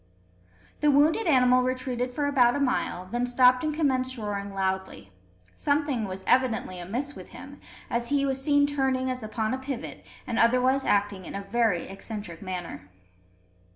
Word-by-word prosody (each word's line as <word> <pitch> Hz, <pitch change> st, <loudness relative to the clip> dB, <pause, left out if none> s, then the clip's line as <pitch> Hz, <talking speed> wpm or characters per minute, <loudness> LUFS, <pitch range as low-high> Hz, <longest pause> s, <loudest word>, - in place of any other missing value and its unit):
The 300 Hz, -, +3 dB
wounded 305 Hz, +8 st, +3 dB
animal 255 Hz, -4 st, +5 dB
retreated 255 Hz, -1 st, -2 dB
for 285 Hz, +4 st, -2 dB
about 255 Hz, -4 st, +3 dB
a -, -, -1 dB
mile, 250 Hz, -9 st, -1 dB
then 240 Hz, +6 st, -2 dB
stopped 250 Hz, +1 st, +4 dB
and 310 Hz, -, 0 dB
commenced 260 Hz, -4 st, 0 dB
roaring 205 Hz, -2 st, -4 dB
loudly. 190 Hz, -, -3 dB, 0.4 s
Something 285 Hz, -5 st, 0 dB
was 190 Hz, 0 st, -7 dB
evidently 240 Hz, -7 st, +1 dB
amiss 245 Hz, +11 st, -3 dB
with -, -, -11 dB
him, -, -, -11 dB, 0.3 s
as 235 Hz, 0 st, -2 dB
he 280 Hz, -1 st, +2 dB
was 270 Hz, -1 st, -1 dB
seen 285 Hz, -1 st, +4 dB
turning 265 Hz, -2 st, 0 dB
as 255 Hz, -, -4 dB
upon 215 Hz, +1 st, -2 dB
a 260 Hz, -, -2 dB
pivot, 265 Hz, -2 st, -6 dB, 0.2 s
and 235 Hz, -2 st, -2 dB
otherwise 255 Hz, +3 st, +3 dB
acting 200 Hz, -2 st, +1 dB
in -, -, -7 dB
a 200 Hz, -, -4 dB
very 205 Hz, -3 st, 0 dB
eccentric 195 Hz, -3 st, -7 dB
manner. 180 Hz, -, -6 dB
250 Hz, 160 wpm, -26 LUFS, 205-270 Hz, 0.4 s, animal